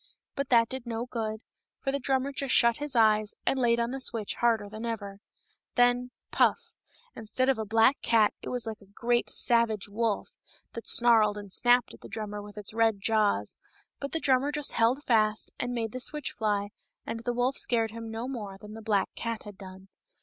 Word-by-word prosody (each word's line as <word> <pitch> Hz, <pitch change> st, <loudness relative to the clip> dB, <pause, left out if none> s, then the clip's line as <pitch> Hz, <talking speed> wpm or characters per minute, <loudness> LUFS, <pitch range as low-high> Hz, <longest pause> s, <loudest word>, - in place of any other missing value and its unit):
But 280 Hz, -2 st, -3 dB
that 230 Hz, -2 st, +5 dB
did 260 Hz, -1 st, -6 dB
no 230 Hz, 0 st, -3 dB
good, 220 Hz, -3 st, -4 dB, 0.4 s
for 270 Hz, -, -2 dB
the 280 Hz, -, -1 dB
drummer 270 Hz, +1 st, 0 dB
just 275 Hz, -1 st, -1 dB
shut 235 Hz, -1 st, +4 dB
his 290 Hz, -3 st, -2 dB
eyes 215 Hz, -2 st, +3 dB
and 270 Hz, -, +1 dB
laid 235 Hz, -1 st, +3 dB
on 235 Hz, +1 st, -1 dB
the 270 Hz, 0 st, -4 dB
switch 225 Hz, -5 st, -1 dB
harder 225 Hz, -3 st, +1 dB
than 215 Hz, +2 st, -8 dB
ever. 205 Hz, -4 st, -5 dB, 0.6 s
Then 245 Hz, 0 st, +3 dB
— -, -, -59 dB
puff! -, -, +2 dB, 0.2 s
— 485 Hz, 0 st, -32 dB
instead 255 Hz, +4 st, -1 dB
of 260 Hz, -4 st, +2 dB
a 220 Hz, -, -2 dB
black 225 Hz, +6 st, +3 dB
cat 220 Hz, -3 st, +3 dB
it -, -, -6 dB
was 245 Hz, -2 st, -2 dB
like 220 Hz, -1 st, -6 dB
a 200 Hz, -, -18 dB
great, 240 Hz, 0 st, 0 dB
savage 230 Hz, -4 st, +2 dB
wolf, 220 Hz, -, -2 dB, 0.4 s
that 230 Hz, -, -8 dB
snarled 225 Hz, -3 st, +5 dB
and 205 Hz, -2 st, -9 dB
snapped 245 Hz, +4 st, +3 dB
at -, -, -15 dB
the -, -, -11 dB
drummer 210 Hz, -2 st, -5 dB
with 205 Hz, 0 st, -12 dB
its 210 Hz, 0 st, -3 dB
red 225 Hz, -2 st, +2 dB
jaws; 215 Hz, 0 st, +1 dB, 0.4 s
but 280 Hz, -, -5 dB
the 325 Hz, -, -1 dB
drummer 275 Hz, 0 st, +2 dB
just 295 Hz, -1 st, 0 dB
held 240 Hz, +5 st, +1 dB
fast 215 Hz, -2 st, +1 dB
and 245 Hz, -, -2 dB
made 230 Hz, -3 st, -2 dB
the 255 Hz, -, -5 dB
switch 300 Hz, +3 st, -2 dB
fly, 205 Hz, -2 st, -1 dB, 0.4 s
and 230 Hz, -, -4 dB
the 245 Hz, +1 st, -2 dB
wolf 245 Hz, +2 st, 0 dB
scared 225 Hz, -2 st, +2 dB
him 230 Hz, 0 st, -7 dB
no 225 Hz, +2 st, -5 dB
more 210 Hz, -7 st, -6 dB
than 210 Hz, +2 st, -11 dB
the 225 Hz, -, -9 dB
black 210 Hz, -3 st, +1 dB
cat 230 Hz, -1 st, -4 dB
had 205 Hz, -2 st, -10 dB
done. 190 Hz, 0 st, -12 dB
230 Hz, 210 wpm, -28 LUFS, 215-245 Hz, 0.6 s, that